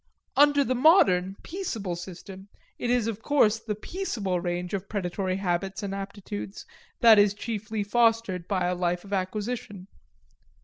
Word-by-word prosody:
Under 285 0 +5
the 255 - 0
modern, 195 - +4
peaceable 225 - -4
system, 185 +2 -9 0.3
it 240 - -2
is 245 -2 +2
of 225 -1 -3
course 225 -5 +3
the 220 -2 -4
peaceable 210 - -3
range 175 +1 -3
of 195 0 -4
predatory 185 -1 -2
habits 190 +1 -2
and 195 -1 -3
aptitudes 200 +1 -6 0.4
that 225 -3 +8
is 205 0 +4
chiefly 215 -1 -3
fostered 225 -5 +1
by 185 -3 0
a 180 - +1
life 175 0 -1
of 200 - -7
acquisition. 205 +1 -3
200 Hz, 145 wpm, -27 LUFS, 185-230 Hz, 0.4 s, that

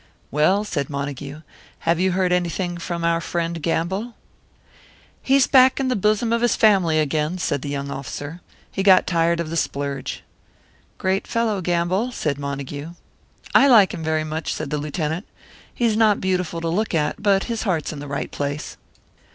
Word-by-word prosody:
"Well," 170 +8 +3
said 145 -10 -3
Montague, 140 +1 -5 0.4
"have 165 0 +1
you 185 0 +2
heard 185 -1 +1
anything 175 0 -1
from 170 0 -4
our 170 0 +2
friend 170 0 -3
Gamble?" 190 +9 -2 1.1
"He's 270 0 +4
back 260 -1 +5
in 265 -1 0
the 255 - +1
bosom 215 +3 +1
of 235 - +1
his 240 - +3
family 190 -7 +4
again," 155 +3 0
said 145 -6 -1
the 140 - -5
young 140 0 -3
officer. 145 +4 -6 0.3
"He - - -2
got 190 -1 +6
tired 170 0 +1
of 165 -2 -3
the - - -3
splurge." 140 -3 -3 0.7
"Great 190 +1 -1
fellow, 225 -4 0
Gamble," 180 +7 0
said 150 - -2
Montague. 140 +3 -5 0.6
"I 275 - +7
liked 220 -8 +6
him 165 - -5
very 155 0 0
much," 155 +1 -3
said 140 - -4
the 150 - -1
Lieutenant. 155 +4 -3 0.4
"He's 230 -3 +1
not 215 -2 +4
beautiful 180 -3 -1
to 165 - -2
look 205 +2 0
at, 150 +4 -1
but 200 -2 +3
his 230 -2 -3
heart's 170 -9 -1
in 150 - -7
the 145 - -7
right 140 0 -4
place." 145 +1 -4
170 Hz, 175 wpm, -22 LUFS, 150-200 Hz, 1.1 s, I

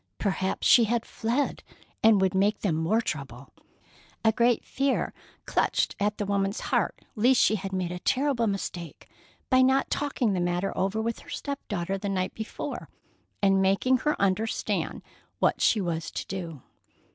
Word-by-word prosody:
Perhaps 190 -2 -1
she 235 - +7
had 230 +1 0
fled, 240 +6 -1 0.4
and 220 -2 +6
would 190 -1 +2
make 200 +3 +2
them 195 -6 +1
more 165 +9 +1
trouble. 140 - -6 0.7
A 220 - +6
great 235 +1 +2
fear 270 0 0 0.3
clutched - - +1
at 205 +1 0
the 205 - -2
woman's 200 0 0
heart - - -1
lest 245 +3 +4
she - - +4
had 195 -2 -3
made 185 -2 -2
a 180 - -5
terrible 260 0 +1
mistake 180 -5 -5 0.4
by 255 0 +6
not 265 +1 +3
talking 265 -7 0
the 185 - 0
matter 175 +2 -1
over 195 +3 0
with 230 +1 -2
her - - -15
step 280 -1 -4
daughter 195 0 -2
the 200 +1 -3
night 185 -1 -1
before, 220 -1 -6 0.5
and 195 -1 +4
making 195 +7 +3
her 300 +4 -1
understand 200 +3 -1 0.3
what - - +1
she 220 - +4
was 170 -4 -2
to - - -5
do. 170 -7 -6
200 Hz, 165 wpm, -27 LUFS, 185-235 Hz, 0.7 s, she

